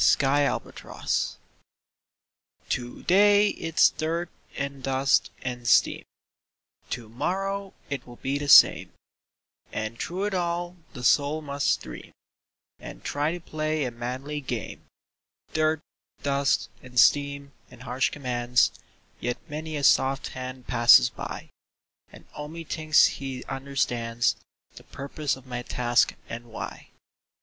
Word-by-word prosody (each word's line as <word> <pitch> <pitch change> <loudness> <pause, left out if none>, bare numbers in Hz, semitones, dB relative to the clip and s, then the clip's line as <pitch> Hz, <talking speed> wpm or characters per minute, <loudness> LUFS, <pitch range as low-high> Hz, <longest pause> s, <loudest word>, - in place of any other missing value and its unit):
THE 140 +1 +3
WORKMAN'S - - -3
DREAM - - -42
To 120 -1 -3
day 205 +2 +5
it's 165 -4 +3
dirt 165 +2 -3 0.3
and 140 -1 -4
dust 135 +1 +2
and 125 -1 -4
steam, - - +4 0.8
To 120 -2 -5
morrow 195 - -3
it 135 -3 -5
will 120 - -11
be 135 +3 -2
the 145 - -4
same, - - +7 0.8
And 110 +1 -4
through 185 +3 -3
it 205 -1 -1
all 175 0 -2 0.2
the 125 - -8
soul 145 +4 +3
must 140 -1 0
dream 60 -1 -10 0.7
And - - -10
try 145 +2 0
to 175 - -5
play 155 -2 -2
a 125 - -3
manly 130 +5 -5
game; 120 -5 -5 0.7
Dirt, 155 0 +1 0.4
dust 140 0 +1
and 125 -1 -2
steam 140 +2 +3 0.2
and 125 0 -14
harsh 125 +1 0
commands, 125 -3 +1 0.5
Yet 120 0 -2
many 155 0 -5
a 145 - -4
soft 135 0 +3
hand 130 0 -7
passes 120 0 +6
by - - -7 0.6
And - - -15
only 155 +3 -7
thinks 155 -1 +4
he 135 -2 -3
understands 125 -4 -1 0.4
The - - -11
purpose 140 +1 -3
of 130 -1 -15
my 125 -1 -4
task 120 0 +1
and 120 +1 -7
why. 115 - -8
140 Hz, 130 wpm, -26 LUFS, 125-155 Hz, 0.8 s, same